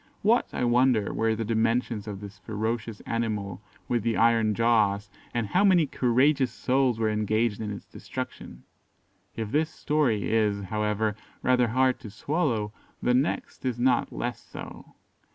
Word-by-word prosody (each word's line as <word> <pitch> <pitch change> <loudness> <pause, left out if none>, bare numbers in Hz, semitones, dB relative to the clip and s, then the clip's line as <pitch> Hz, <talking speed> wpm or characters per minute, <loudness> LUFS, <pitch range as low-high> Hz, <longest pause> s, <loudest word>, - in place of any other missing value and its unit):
What, 230 +4 +3
I - - -2
wonder, 120 -3 +3
were 110 0 +1
the 115 0 -3
dimensions 115 0 0
of 100 -1 -6
this 100 -1 -10
ferocious 110 +2 -3
animal 105 -5 -3 0.3
with 120 -1 +1
the 115 +1 0
iron 115 -2 +3
jaws; 105 -3 +2 0.2
and 120 -2 -1
how 185 - +2
many 185 -5 +5
courageous 130 0 +2
souls 130 -1 +1
were 110 -1 +1
engaged 110 +1 0
in 105 - -3
its 100 - -7
destruction. 60 - -7 0.7
If 110 -2 -4
this 155 +2 +2
story 140 -11 0
is, 105 -2 +2
however, 105 +1 -1 0.3
rather 125 -1 +3
hard 130 +2 +2
to 110 - -9
swallow, 115 - -1 0.3
the 125 - +1
next 135 +6 -1
is 125 -3 -1
not 125 +1 +2
less 120 0 -4
so. - - -10
115 Hz, 150 wpm, -27 LUFS, 105-125 Hz, 0.7 s, many